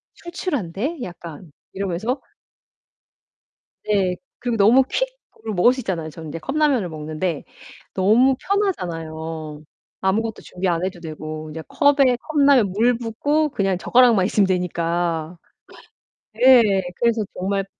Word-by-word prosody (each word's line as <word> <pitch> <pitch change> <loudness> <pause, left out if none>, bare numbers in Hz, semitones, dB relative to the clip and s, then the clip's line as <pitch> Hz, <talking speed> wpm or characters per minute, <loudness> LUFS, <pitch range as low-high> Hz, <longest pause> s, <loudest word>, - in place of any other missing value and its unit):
"출출한데 290 - -4
약간?" 170 -3 -9 0.2
이러면서 200 +7 -2 1.7
네 195 -3 +1 0.2
그리고 240 -2 -2
너무 225 +6 +6
퀵으로 - - -5
먹을 200 +7 +4
수 260 - -6
있잖아요. 170 -8 -3
저는 160 +1 -10
인제 165 +3 -6
컵라면을 270 - +1
먹는데 155 +1 -4 0.5
너무 225 +8 +4
편하잖아요. 165 - -3 0.4
아무것도 220 +3 -1
준비 185 +1 -4
안 170 -1 0
해도 185 -1 -5
되고 155 -1 -7
이제 160 +1 -6
컵에 275 -4 +3
컵라면 280 -9 +3
물 230 +5 +2
붓고 290 +7 0
그냥 195 -7 0
젓가락만 235 -1 +4
있으면 200 0 +2
되니까. 170 -2 -1 1.0
네. 225 -5 +5
그래서 235 -2 +1
정말 195 +1 -2
195 Hz, 280 characters per minute, -21 LUFS, 170-250 Hz, 1.7 s, 너무